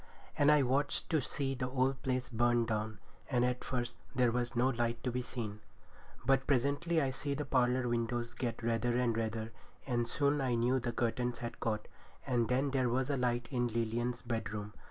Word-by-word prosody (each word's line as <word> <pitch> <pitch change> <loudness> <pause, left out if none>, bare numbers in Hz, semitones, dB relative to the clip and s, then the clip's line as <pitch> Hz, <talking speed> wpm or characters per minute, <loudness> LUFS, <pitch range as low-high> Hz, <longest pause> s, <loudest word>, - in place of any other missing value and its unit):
And 145 +1 +5
I 150 -2 +5
watched 140 +3 0
to 155 -3 +3
see 135 +1 -2
the 125 -1 -2
old 130 +1 +1
place 130 -1 -1
burn 120 0 +2
down; 110 -1 -2 0.3
and 125 -3 +3
at 125 0 -1
first 120 -2 -2 0.2
there 125 -2 +4
was 120 +1 -1
no 125 +2 +3
light 120 -2 -1
to 125 - 0
be 125 +1 -1
seen. 110 -4 -5 0.7
But 135 0 +3
presently 145 +5 +2
I 135 -3 +1
see 140 +2 -3
the 150 +1 -3
parlour 125 -1 +2
windows 120 0 -1
get 120 -2 -3
redder 115 +1 +1
and 120 -2 +2
redder, 110 0 -2 0.3
and 120 -3 0
soon 140 +3 +1
I 125 -3 +1
knew 125 +3 +2
the 120 -1 -2
curtains 120 +1 -1
had 120 -1 -6
caught, 110 -2 -1 0.4
and 120 -4 +1
then 130 +4 +1
there 130 -2 +2
was 130 +3 +1
a 140 - +1
light 120 -1 0
in 120 -2 +1
Lilian's 115 +1 -1
bedroom. 105 -3 -3
125 Hz, 195 wpm, -34 LUFS, 115-130 Hz, 0.7 s, And